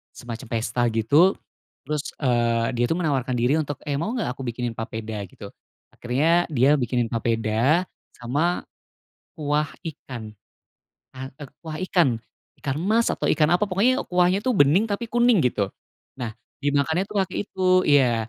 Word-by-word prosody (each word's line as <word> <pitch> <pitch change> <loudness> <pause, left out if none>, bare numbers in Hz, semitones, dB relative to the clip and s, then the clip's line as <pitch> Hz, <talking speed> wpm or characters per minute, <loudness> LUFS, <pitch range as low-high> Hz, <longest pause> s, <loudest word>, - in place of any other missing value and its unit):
semacam 120 0 -8
pesta 115 +2 0
gitu, 140 - +4 0.5
terus, 150 +1 -2 0.2
eee, 120 -2 +2
dia 120 - +4
tuh 165 - 0
menawarkan 130 -6 0
diri 125 +6 +2
untuk, 145 -1 -2
“Eh, 145 -1 -2
mau 220 +9 -2
gak 225 - -1
aku 130 0 -7
bikinin 120 0 -3
papeda?” 110 -1 -5
gitu. - - -11 0.4
Akhirnya 155 +8 +1
dia 145 0 +3
bikinin 120 -2 -1
papeda 115 +7 +1 0.3
sama 145 +9 -1 0.7
kuah 150 0 0 0.2
ikan, 120 -8 -7 0.8
ka 130 +1 -7
k - - -26 0.2
kuah 155 -1 -6
ikan, 140 -12 +2 0.4
ikan 135 -1 -3
mas 220 +5 +2
atau - - -1
ikan 155 0 +3
apa, 180 - +1
pokoknya 240 +8 +2
kuahnya 180 +2 +3
tuh 255 - +1
bening 175 +11 +4
tapi 205 +4 -2
kuning 240 -1 +4
gitu. 100 -5 -1 0.5
Nah, 115 -4 -4 0.3
dimakannya 145 +6 +1
tuh 210 - -7
pakai - - -8
itu 190 -1 -4 0.2
iya, 120 -6 +3
140 Hz, 150 wpm, -24 LUFS, 120-170 Hz, 0.8 s, gitu